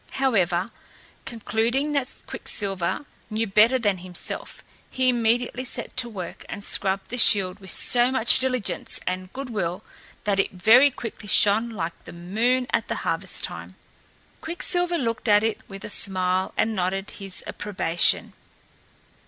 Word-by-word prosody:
However, 190 -8 +1 0.6
concluding 235 +5 -1
that 280 -3 -3
Quicksilver 190 -2 -3 0.3
knew 220 +1 -1
better 220 +5 +4
than 205 -6 0
himself, 180 0 -5 0.3
he 255 -1 +1
immediately 240 +1 0
set 255 - -6
to 245 -2 +2
work 185 -6 -7
and 205 - -6
scrubbed 195 -1 -1
the 245 - -2
shield 195 -3 +6
with 190 -1 -10
so 240 +7 +4
much 240 -2 +3
diligence 255 -5 -2
and 185 0 -4
good 270 -1 -6
will 180 -5 -3 0.4
that 200 -2 0
it 195 - 0
very 225 +10 +6
quickly 230 -5 -8
shone 210 +4 +4
like 175 -7 -6
the - - -10
moon 225 +9 0
at - - 0
harvest - - -2
time. - - -6 0.7
Quicksilver 350 +1 -1
looked 230 -4 -2
at 210 0 +5
it 225 0 -1
with 195 -1 -9
a - - -6
smile 185 -1 0
and 220 0 +1
nodded 190 +1 -2
his 195 -2 -6
approbation. 175 -5 0
215 Hz, 145 wpm, -24 LUFS, 190-245 Hz, 0.7 s, shield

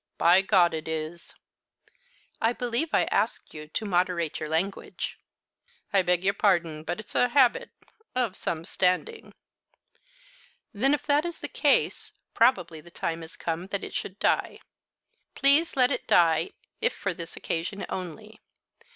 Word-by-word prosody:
By 175 +3 +5
God, 185 -4 +4
it 160 0 -4
is!" 160 +1 -5 1.1
"I 225 +2 +3
believe 245 +6 -2
I - - +3
asked 215 +4 -1
you 150 0 -9
to 215 +8 -3
moderate 180 -4 0
your 155 - -5
language." 175 +5 -3 0.7
"I 195 - +5
beg 180 0 +1
your 195 +1 +2
pardon; 170 -7 +1
but 170 +5 -4
it's 215 - -9
a 245 - +3
habit 255 -2 +3 0.5
of 240 -7 0
some 165 0 -3
standing." 190 - -1 1.4
"Then 270 +8 +3
if - - -8
that 295 +1 +3
is 345 -1 -4
the - - -6
case, - - +1 0.2
probably 180 -9 +2
the 175 - -15
time 165 0 -3
is 160 0 -10
come 170 +2 -3
that 200 0 -3
it - - -7
should 190 - -4
die. - - 0 0.7
Please 285 +4 +3
let 250 -2 +4
it - - -3
die 165 -1 +3 0.3
if 480 +2 +2
for 200 -2 -2
this 170 -1 -8
occasion 175 +5 -3
only. 210 +4 -7
185 Hz, 150 wpm, -27 LUFS, 165-235 Hz, 1.4 s, By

